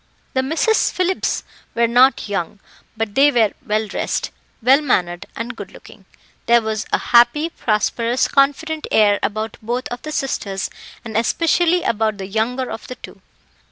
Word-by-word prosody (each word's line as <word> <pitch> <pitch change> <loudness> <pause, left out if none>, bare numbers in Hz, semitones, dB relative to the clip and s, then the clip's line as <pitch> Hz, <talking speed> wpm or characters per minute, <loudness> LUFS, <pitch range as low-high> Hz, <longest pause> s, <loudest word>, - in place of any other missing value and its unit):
The 260 - +2
Misses 320 +11 +1
Phillips 370 0 -1 0.3
were 235 - +3
not 245 +1 +4
young, 200 0 -3 0.4
but 220 -2 -2
they 275 +5 +5
were 225 -5 +3
well 215 +1 0
dressed, 210 - -3 0.3
well 265 +5 +5
mannered, 175 -11 -1
and 235 +2 -5
good 200 -3 -9
looking. 195 - -15 0.4
There 235 0 +6
was 220 -1 -3
a - - +3 0.2
happy, 240 +7 +5
prosperous, 230 +2 0
confident 300 +3 +1
air 205 -2 +4
about 215 +1 -3
both 240 +3 -3
of 245 0 -6
the 305 - -6
sisters, 200 -9 -3 0.3
and 220 -2 -7
especially 335 +8 +2
about 215 -1 0
the 195 - -6
younger 230 +6 -2
of - - -7
the 255 - -7
two. - - -13
235 Hz, 155 wpm, -19 LUFS, 215-275 Hz, 0.4 s, There